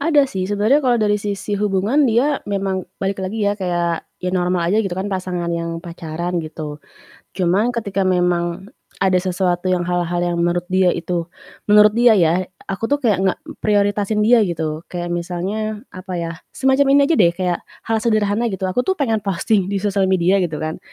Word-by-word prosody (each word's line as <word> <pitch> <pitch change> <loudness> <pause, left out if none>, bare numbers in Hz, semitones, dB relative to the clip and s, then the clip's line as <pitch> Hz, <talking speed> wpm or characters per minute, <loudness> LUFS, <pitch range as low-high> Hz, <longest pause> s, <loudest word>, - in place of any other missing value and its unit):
Ada 295 -1 +4
sih 190 -8 -3
sebenernya 210 +8 +3
kalau 250 -4 +2
dari 210 -2 +1
sisi 205 0 -4
hubungan 210 +8 +2
dia 265 +6 +2
memang 195 -2 -2
balik 195 0 -2
lagi 205 +3 -2
ya, 205 - +2
kayak 175 -4 -2
ya 180 0 -4
normal 180 -1 +1
aja 215 - +3
gitu 195 -5 -3
kan, 195 +2 -3
pasangan 180 -2 -2
yang 170 0 -3
pacaran 170 +1 -4
gitu. 155 -2 -7 0.5
Cuman 195 +6 +1
ketika 200 -4 -1
memang 180 +1 0 0.3
ada 185 -1 +3
sesuatu 180 -1 -1
yang 180 -1 +1
hal-hal 175 0 -1
yang 175 -1 0
menurut 175 +1 +1
dia 185 -1 +3
itu 170 0 -3 0.4
menurut 210 0 +7
dia 240 -2 +6
ya, 175 -1 +2 0.2
aku 195 +4 -2
tuh 285 +1 0
kayak 215 -6 +2
enggak 190 - 0 0.2
prioritasin 205 0 +1
dia 235 +3 +5
gitu 160 -2 -3
kayak 175 -1 -5
misalnya 195 +5 -3
apa 185 0 -7
ya, 170 -1 -3 0.2
semacam 270 +1 +3
ini 285 - +6
aja - - +5
deh, 170 -5 +5
kayak 180 -1 -1 0.2
hal 225 0 0
sederhana 215 0 +1
gitu, 190 -3 -2
aku 250 +7 -1
tuh 380 - +2
pengen 250 -10 0
posting 200 0 0
di 195 0 -2
sosial 200 -2 +1
media 185 +1 +3
gitu 165 -5 -2
kan, 155 0 -3
190 Hz, 185 wpm, -19 LUFS, 175-210 Hz, 0.5 s, menurut